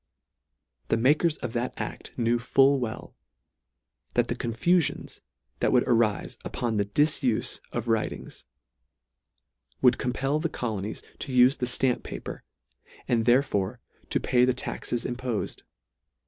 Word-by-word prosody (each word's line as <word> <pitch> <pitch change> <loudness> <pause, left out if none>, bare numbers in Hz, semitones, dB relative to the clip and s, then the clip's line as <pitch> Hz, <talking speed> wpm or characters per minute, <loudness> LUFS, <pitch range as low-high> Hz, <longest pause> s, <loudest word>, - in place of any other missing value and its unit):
The - - +2
makers 150 +7 +3
of 120 -2 -5
that 120 +1 -2
act - - -6
knew 120 0 +2
full 135 +3 +4
well, 115 -3 -5 1.0
that 120 -1 +2
the 120 - 0
confulions 135 +9 0 0.4
that - - +2
would 125 - +4
arife 115 -4 +1
upon 115 -3 -2
the 100 - +2
difufe 130 +1 +1
of 120 -1 -3
writings 110 - -2 1.4
would 125 -1 +4
compel 135 +4 0
the 165 +1 -1
colonies 110 -6 -4 0.2
to 140 - -5
ufe 125 +2 +5
the 125 - 0
ftamp 125 0 +1
paper, - - -7 0.6
and 115 -2 +1
therefore 120 -6 +2 0.3
to - - +1
pay 125 -1 +3
the 125 0 +3
taxes 120 -1 -3
impofed. 125 -3 -3
125 Hz, 130 wpm, -27 LUFS, 115-130 Hz, 1.4 s, ufe